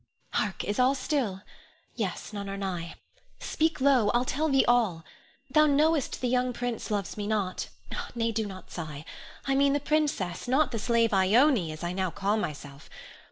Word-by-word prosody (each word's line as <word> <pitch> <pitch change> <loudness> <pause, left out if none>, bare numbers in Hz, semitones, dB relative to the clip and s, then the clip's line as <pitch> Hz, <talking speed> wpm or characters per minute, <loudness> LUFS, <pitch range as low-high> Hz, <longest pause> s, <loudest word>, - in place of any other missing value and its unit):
Hark! 205 -2 -1
is 205 +4 -2
all 255 +2 +4
still? 255 -8 -1 0.5
Yes; - - -4
none 200 -1 -5
are 195 - -4
nigh! 180 -4 -4 0.4
Speak 320 +1 0
low. 260 -6 +4
I'll 245 +1 +2
tell 310 +5 0
thee 270 -1 +4
all. 220 -9 +2 0.5
Thou 305 -1 +5
knowest 300 0 +2
the 250 - +1
young 250 0 +1
prince 240 -1 -4
loves 205 -2 -2
me 205 -1 -3
not, 205 -4 -1 0.5
nay, 230 -1 0
do 220 -1 -1
not 190 -2 -10
sigh; 155 -3 -6 0.4
I 275 - +1
mean 275 +1 +4
the 290 - +2
princess, 285 - -1
not 265 +2 +2
the 230 - -2
slave 230 -1 +2
Ione, 200 - +4
as 155 +2 -8
I 175 +1 -2
now 185 0 0
call 200 +4 0
myself. 145 -6 -6
230 Hz, 175 wpm, -28 LUFS, 190-270 Hz, 0.5 s, Thou